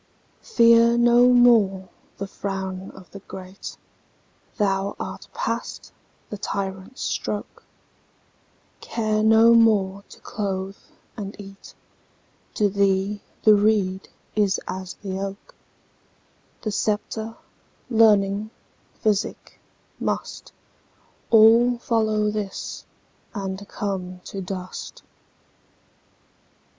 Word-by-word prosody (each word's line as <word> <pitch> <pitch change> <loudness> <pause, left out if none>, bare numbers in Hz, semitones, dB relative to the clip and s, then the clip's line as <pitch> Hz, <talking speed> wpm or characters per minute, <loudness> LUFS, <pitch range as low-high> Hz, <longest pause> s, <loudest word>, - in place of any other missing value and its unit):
Fear 235 0 +5
no 240 +1 +5
more 220 -6 +4 0.3
the 200 - -4
frown 190 -1 -5
o' 190 - -11
the 200 - -9
great, 190 0 -9 0.8
Thou 195 -2 0
art - - -6
past - - -4 0.4
the 210 - -5
tyrant's 195 +5 -4
stroke; - - -4 1.2
Care 215 -2 -1
no 225 +1 +6
more 200 -4 +3
to - - -14
clothe 195 -2 -4 0.4
and 205 -3 -6
eat; 195 -1 -12 0.8
To 210 - +3
thee 200 0 +1 0.2
the 215 - +7
reed 205 -2 +1 0.3
is 205 -2 +2
as 185 -1 -5
the 190 -1 -4
oak:The 195 +2 -11
sceptre, 220 +2 -2 0.5
learning, 210 -3 +3 0.5
physic, 210 -3 -1 0.4
mustAll 230 +2 +1
follow 215 -3 +1
this, 210 -2 -5 0.5
and 195 0 -5
come 185 -3 -4
to 195 - -6
dust. 185 0 -7
205 Hz, 85 wpm, -23 LUFS, 195-220 Hz, 1.2 s, the